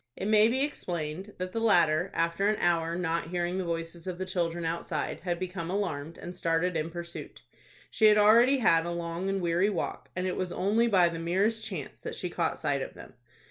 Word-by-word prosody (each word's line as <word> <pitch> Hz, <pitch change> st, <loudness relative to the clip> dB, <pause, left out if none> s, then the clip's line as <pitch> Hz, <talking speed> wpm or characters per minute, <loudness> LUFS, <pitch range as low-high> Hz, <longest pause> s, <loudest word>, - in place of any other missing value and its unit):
It -, -, -4 dB
may 215 Hz, 0 st, +6 dB
be 260 Hz, +4 st, +1 dB
explained 180 Hz, -, -4 dB
that 185 Hz, 0 st, -4 dB
the 225 Hz, -, -2 dB
latter, 175 Hz, -5 st, +3 dB
after 170 Hz, +4 st, +1 dB
an 215 Hz, -, +2 dB
hour, 170 Hz, -1 st, +1 dB
not 170 Hz, -1 st, -1 dB
hearing 175 Hz, +1 st, -2 dB
the -, -, -1 dB
voices 165 Hz, 0 st, -4 dB
of 180 Hz, -1 st, -4 dB
the 185 Hz, -, -3 dB
children 175 Hz, -2 st, -2 dB
outside, 165 Hz, -2 st, -2 dB
had 175 Hz, -2 st, -2 dB
become 180 Hz, -2 st, -5 dB
alarmed, 165 Hz, -5 st, -3 dB
and 175 Hz, 0 st, -8 dB
started 165 Hz, +2 st, 0 dB
in 160 Hz, 0 st, -1 dB
pursuit. 170 Hz, 0 st, -8 dB, 0.5 s
She 220 Hz, -, +2 dB
had 210 Hz, 0 st, +6 dB
already 230 Hz, +6 st, +6 dB
had 170 Hz, -9 st, +3 dB
a -, -, -2 dB
long 170 Hz, +2 st, -3 dB
and 195 Hz, -1 st, -1 dB
weary 175 Hz, +3 st, +2 dB
walk, 190 Hz, -5 st, -4 dB
and 180 Hz, +1 st, -2 dB
it 185 Hz, -, -1 dB
was 185 Hz, -1 st, -3 dB
only 215 Hz, +7 st, +2 dB
by 185 Hz, -6 st, +4 dB
the 165 Hz, -1 st, -5 dB
merest 200 Hz, +7 st, +1 dB
chance 185 Hz, -10 st, -6 dB
that -, -, -6 dB
she -, -, -4 dB
caught -, -, -1 dB
sight -, -, 0 dB
of -, -, -6 dB
them. -, -, -12 dB
175 Hz, 215 wpm, -29 LUFS, 165-195 Hz, 0.5 s, may